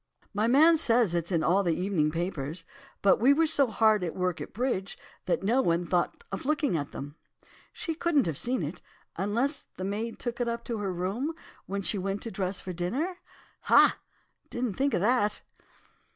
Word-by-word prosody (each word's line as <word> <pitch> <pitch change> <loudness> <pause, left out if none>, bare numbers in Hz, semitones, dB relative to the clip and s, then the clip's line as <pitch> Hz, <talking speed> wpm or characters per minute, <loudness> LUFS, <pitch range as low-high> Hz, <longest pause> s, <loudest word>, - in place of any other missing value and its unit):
"'My 210 +2 +1
man 315 +7 +6
says 235 - +3
it's 170 +1 -1
in 165 -3 +1
all 185 +5 +3
the 170 -4 +1
evening 180 -5 +1
papers, 165 -1 -3 0.4
but 195 - +5
we 265 +5 +6
were 325 +3 +3
so 285 -3 +3
hard 215 -2 +3
at 170 - -3
work 180 -2 -1
at - - -7
bridge, 220 -4 -2 0.3
that 185 - 0
no 235 +7 +3
one 170 -4 +1
thought 175 0 -1
of 195 - -4
looking 295 - +1
at 145 -3 -3
them. 145 +3 -8 0.5
She 330 - -4
couldn't 310 -4 +1
have 160 - -2
seen 245 - +1
it, 160 +5 -6 0.3
unless 235 - 0
the 185 - -4
maid 215 +4 -3
took 240 0 -4
it 240 - 0
up 235 0 -3
to 230 -3 -3
her 200 -2 -2
room 200 - -2 0.3
when 200 +1 -3
she 200 - 0
went 195 +2 -3
to 230 - -5
dress 190 -2 -2
for 185 - -6
dinner. 270 - -2 0.5
Ha! - - +6 0.5
didn't 240 -3 -2
think 275 +3 0
of - - 0
that. 210 -1 +1
205 Hz, 195 wpm, -28 LUFS, 180-250 Hz, 0.5 s, man